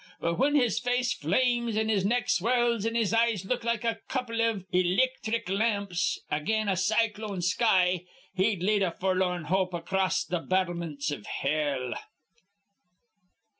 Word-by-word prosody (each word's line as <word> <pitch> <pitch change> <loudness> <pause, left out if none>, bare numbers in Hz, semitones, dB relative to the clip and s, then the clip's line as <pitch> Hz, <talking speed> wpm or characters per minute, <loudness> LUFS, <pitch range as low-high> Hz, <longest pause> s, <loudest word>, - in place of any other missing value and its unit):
But, 170 0 -1
whin 285 +4 +2
his 245 -6 +2
face 245 0 0
flames 235 - 0
an' 220 0 +1
his 205 -4 +1
neck 240 +5 +1
swells 235 +1 +1
an' 230 - -2
his 225 -3 +1
eyes 225 -4 +2
look 240 +3 -2
like 235 -1 -1
a 230 -1 -1
couple 240 -3 -2
iv 225 -5 0
ilicthric 220 +5 +1
lamps 200 -3 0
again 215 +8 0
a 195 - +2
cyclone 210 0 0
sky, 180 -2 +2 0.3
he'd 190 -1 0
lead 205 +1 +2
a 190 - +2
forlorn 185 -2 0
hope 185 +2 0
acrost 185 +1 -1
th' 175 -2 0
battlemints 170 -6 -1
iv 125 -8 -6
hell." 140 -4 -1
200 Hz, 145 wpm, -28 LUFS, 180-230 Hz, 0.3 s, whin